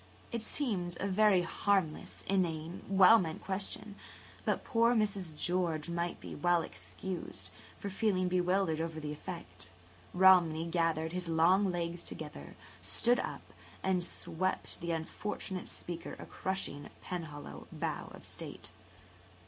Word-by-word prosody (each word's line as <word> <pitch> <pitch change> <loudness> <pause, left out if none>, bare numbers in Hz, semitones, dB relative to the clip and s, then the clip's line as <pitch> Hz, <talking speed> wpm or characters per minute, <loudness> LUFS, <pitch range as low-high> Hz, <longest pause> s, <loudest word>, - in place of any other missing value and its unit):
It 235 - -2
seemed 200 -9 -1
a 200 - 0
very 200 -2 +5
harmless, 190 -3 0
inane, 170 -3 0
well 195 +3 +8
meant 160 -3 -3
question. 195 +1 -1 0.7
Poor 230 0 +4
Mrs. 200 -7 0
George 170 -1 0
might 170 0 -1 0.2
well 175 -1 +4
be - - -4
excused 165 - -5 0.3
for 200 - -5
feeling 190 -2 +2
bewildered 180 -2 +2
over 165 -1 -3
the 150 -1 -4
effect. 150 - -7 0.5
Romney 175 -4 +6
gathered 165 -1 +1
his 180 0 -3
long 180 +4 +4
legs 170 0 -2
together, 150 - -7 0.3
stood 165 - +2
[Page - - 0
139] - - -4
up, - - -17 0.3
and 185 -2 +2
swept 185 +1 -2
the 170 - -3
unfortunate 185 +3 -3
speaker 170 -1 -4
a - - -8
crushing 190 -6 -3
Penhallow 160 -5 -6
bow - - -3
of - - -11
state. - - -7
180 Hz, 130 wpm, -33 LUFS, 165-190 Hz, 0.7 s, well